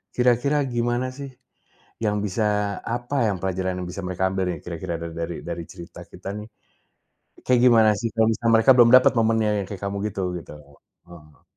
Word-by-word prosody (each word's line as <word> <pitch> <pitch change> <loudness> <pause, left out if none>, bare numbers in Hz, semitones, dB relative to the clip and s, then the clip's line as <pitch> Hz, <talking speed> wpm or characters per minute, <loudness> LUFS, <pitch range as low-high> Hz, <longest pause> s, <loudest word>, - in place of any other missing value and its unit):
Kira-kira 125 +4 +2
gimana 120 +1 -1
sih 140 -1 -8 0.7
yang 105 -1 0
bisa 105 0 -1
apa 120 +1 -1
yang 95 - -3
pelajaran 95 -1 -2
yang 90 - -5
bisa 95 +2 -6
mereka 95 +1 -1
ambil 95 -1 -1
nih 85 - -6
kira-kira 85 0 -5
dari 85 0 -5
dari 85 0 -5
cerita 85 -2 -11
kita 100 - -8
nih, 105 - -8 1.0
kayak 125 -1 +4
gimana 115 -3 +6
sih 115 +3 -2
kalau 110 -1 +3 0.2
mereka 115 +3 +5
belum 120 -1 +7
dapat 130 - +7
momennya 110 -1 +2
yang - - -10
kayak 100 -2 -7
kamu 100 0 -3
gitu, 95 -2 -3
gitu? 80 - -11 0.6
Heeh. 75 -3 -16
105 Hz, 170 wpm, -23 LUFS, 90-120 Hz, 1.0 s, belum